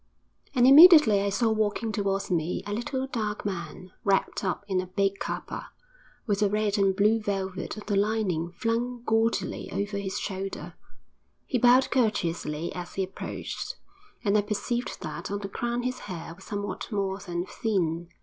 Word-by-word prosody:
And 245 -1 +5
immediately 295 - +9
I 200 - 0
saw 225 +3 +1
walking 220 +1 0
towards 195 -2 -1
me 170 0 0
a 205 - -3
little, 260 +4 -2
dark 215 -6 -3
man, 185 -1 -5
wrapped 195 0 +1
up 190 +1 -2
in 190 -2 +1
a 185 - -7
big 195 +1 0
capa, - - -5 0.6
with 205 -3 0
the 205 -1 +3
red 210 0 0
and 195 -1 +3
blue 210 +3 +3
velvet 195 -1 -3
of 210 - -8
the 205 - 0
lining 195 -5 0
flung 235 +2 -2
gaudily 225 -3 0
over 200 0 -2
his 190 -1 -3
shoulder. 195 0 -5 0.7
He 250 - 0
bowed 250 +2 +5
courteously 170 - 0
as 180 -1 -7
he 195 - 0
approached, 190 +1 -5 0.5
and 200 0 +3
I 210 - +5
perceived 215 +4 -3
that - - -5
on 200 - -2
the 200 -1 -5
crown 240 +3 -2
his 255 0 -2
hair 170 -3 -7
was 185 +3 -15
somewhat 205 +3 -4
more 195 -2 -1
than 175 -2 -4
thin. 175 -6 -1
205 Hz, 170 wpm, -27 LUFS, 190-225 Hz, 0.7 s, immediately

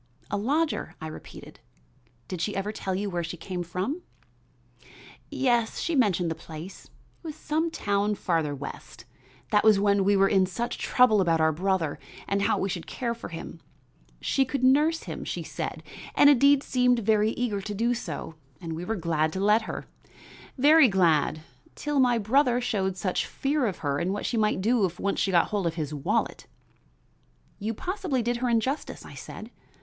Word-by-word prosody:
"A - - 0
lodger?" 295 +9 -1
I - - -7
repeated. 155 - -10 0.7
"Did 185 -3 -5
she 205 +3 -2
ever 195 +2 -2
tell 190 -3 -3
you 200 +2 -2
where 175 -3 -2
she 165 +1 -6
came 180 +2 -5
from?" 185 - -3 1.3
"Yes, 240 -4 +1
she 335 - -1
mentioned 185 - +2
the - - +1
place, 165 +4 -10
it - - -23 0.3
was 315 -3 -7
some 315 +2 -1
town 205 -7 0
farther 165 -6 -1
west. 130 -4 -9 0.5
That 210 - +4
was 215 -2 +6
when 200 -1 +3
we 200 +1 +3
were 195 0 +5
in 190 -2 +3
such 235 +6 -4
trouble 235 -5 +4
about 165 -3 +2
our 160 0 +4
brother 180 -1 -1 0.3
and 200 0 0
how - - +2
we 195 - -1
should 180 -3 -5
care 235 -2 -2
for 235 - -8
him. 165 0 -8 0.6
She 270 - +1
could 265 0 -3
nurse 300 +5 +4
him, - - -6
she - - -4
said, - - -5 0.3
and 285 - +7
indeed 280 +1 +5
seemed 250 -1 +2
very 215 -1 +2
eager 220 -5 -2
to 205 +1 -5
do 235 +4 +1
so, 165 -8 -5 0.3
and 165 -3 -5
we 165 +2 -5
were 225 +5 -2
glad 160 -4 0
to 190 - -3
let 210 +3 +4
her, - - -5 0.7
very 295 +2 +7
glad, 165 -6 +2 0.3
till 295 -2 -1
my 245 -2 +4
brother 245 +3 +2
showed 195 -6 -1
such 185 -1 -1
fear 275 -2 0
of 195 - -3
her 140 0 0
and 170 - -1
of - - 0
what - - -4
she - - -1
might 215 -3 +1
do 230 +2 +2
if 180 -2 0
she - - -12
once 200 0 +1
got 175 -3 +3
hold 200 -4 0
of 165 - -2
his 155 -3 -3
wallet." 145 -2 -1 1.1
"You 215 +2 -3
possibly 360 - -2
did 240 +1 0
her 250 +1 -1
injustice," 240 +5 -1
I - - -11
said. - - -9
205 Hz, 190 wpm, -27 LUFS, 180-250 Hz, 1.3 s, and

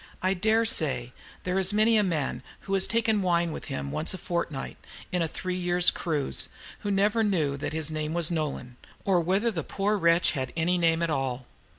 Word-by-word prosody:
I 185 +1 +3
dare 220 +4 +2
say 130 - +1 0.3
there 185 +1 0
is 190 +1 +2
many 215 +2 +4
a 215 - +5
man 165 -8 -1 0.2
who 195 - -5
has 195 -1 +4
taken 225 -2 +1
wine 170 -2 +1
with - - -7
him 70 -1 -4
once 160 +4 0
a - - -6
fortnight, 170 -6 -4 0.3
in 180 - 0
a 165 - +1
three 185 +3 -4
years' 175 0 +3
cruise, 150 - -1 0.3
who 205 - -4
never 205 +3 +2
knew 160 -9 +1
that 140 - -4
his 160 0 -2
name 155 +1 -3
was 170 -1 +1
"Nolan," 145 -6 -3 0.3
or 185 -3 +3
whether 195 +7 +1
the 165 -7 -3
poor 205 +5 -1
wretch 170 0 +3
had 130 -4 -3
any 175 +2 +1
name 165 0 +2
at 165 - 0
all. 130 -3 -2
175 Hz, 205 wpm, -27 LUFS, 155-195 Hz, 0.3 s, a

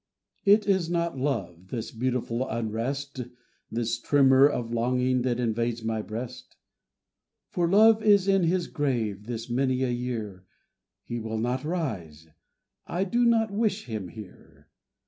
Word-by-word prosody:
IT 205 +1 +5
is 190 -4 +2
not 170 -2 0
Love, 100 - -3
this 115 +1 -5
beautiful 125 +1 -2
unrest, 120 +5 -3 0.5
This 115 +1 -2
tremor 135 +1 +5
of 120 -5 -3
longing 125 +2 +1
that 125 -1 0
invades 115 0 -1
my 110 -1 -1
breast: 120 +4 -7 0.9
For 175 -2 0
Love 220 +3 +6
is 205 -3 +4
in 195 -3 +3
his 175 +1 +1
grave 115 -10 -2
this 115 -1 -4
many 130 +1 0
a 125 - 0
year, 115 -6 -4 0.6
He 120 - -4
will 110 0 -4
not 125 +3 -1
rise 105 - -4 0.6
I 180 +2 -1
do 235 +6 +1
not 225 -2 +3
wish 210 -1 0
him 110 -6 -5
here. 100 +1 -13
125 Hz, 140 wpm, -27 LUFS, 115-170 Hz, 0.9 s, Love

